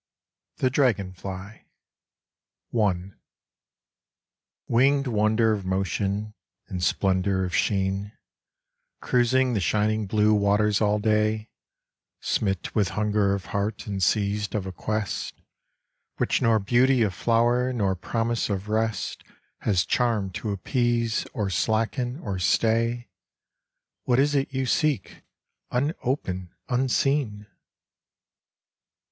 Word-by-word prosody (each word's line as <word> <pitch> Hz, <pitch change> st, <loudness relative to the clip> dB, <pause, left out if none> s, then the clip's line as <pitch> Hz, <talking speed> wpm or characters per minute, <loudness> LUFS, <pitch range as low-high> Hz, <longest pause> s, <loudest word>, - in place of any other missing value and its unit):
THE 130 Hz, -, +1 dB
DRAGONFLY. 100 Hz, -5 st, -2 dB, 1.1 s
I. 100 Hz, -5 st, 0 dB, 1.5 s
Winged 140 Hz, +4 st, +3 dB
wonder 110 Hz, 0 st, +2 dB
of 105 Hz, -3 st, -1 dB
motion 95 Hz, +3 st, -1 dB, 0.3 s
In 90 Hz, -, -4 dB
splendor 95 Hz, +1 st, +1 dB
of 90 Hz, -, -3 dB
sheen, 100 Hz, 0 st, 0 dB, 0.9 s
Cruising 125 Hz, +1 st, +2 dB
the 105 Hz, -, +1 dB
shining 105 Hz, +4 st, +1 dB
blue 105 Hz, +1 st, +3 dB
Waters 105 Hz, +1 st, +2 dB
all 105 Hz, 0 st, +3 dB
day, 110 Hz, 0 st, 0 dB, 0.7 s
Smit 95 Hz, -3 st, -1 dB
with 105 Hz, -3 st, +2 dB
hunger 105 Hz, -2 st, +2 dB
of 100 Hz, -, -6 dB
heart 100 Hz, +2 st, -2 dB
And 100 Hz, -2 st, -4 dB
seized 105 Hz, +1 st, +1 dB
of 100 Hz, -3 st, -1 dB
a 95 Hz, -, -4 dB
quest 110 Hz, +2 st, -3 dB, 0.8 s
Which -, -, +1 dB
nor 115 Hz, -3 st, +4 dB
beauty 120 Hz, +4 st, +3 dB
of 100 Hz, -4 st, 0 dB
flower 120 Hz, +3 st, +2 dB
Nor 100 Hz, -6 st, 0 dB
promise 115 Hz, +5 st, -1 dB
of 100 Hz, +1 st, -3 dB
rest 110 Hz, -1 st, -1 dB, 0.4 s
Has 95 Hz, -5 st, +1 dB
charm 115 Hz, -6 st, 0 dB
to 105 Hz, +4 st, -4 dB
appease 115 Hz, +3 st, 0 dB
Or 100 Hz, -3 st, -2 dB
slacken 115 Hz, +6 st, 0 dB
or 95 Hz, -4 st, -3 dB
stay, 115 Hz, +5 st, +1 dB, 1.0 s
What 125 Hz, -, +2 dB
is 145 Hz, +2 st, +3 dB
it 140 Hz, -1 st, 0 dB
you 130 Hz, -1 st, -1 dB
seek, 150 Hz, +2 st, 0 dB, 0.5 s
Unopen, 125 Hz, -, -2 dB, 0.2 s
unseen? 130 Hz, -3 st, 0 dB
105 Hz, 105 wpm, -25 LUFS, 100-120 Hz, 1.5 s, nor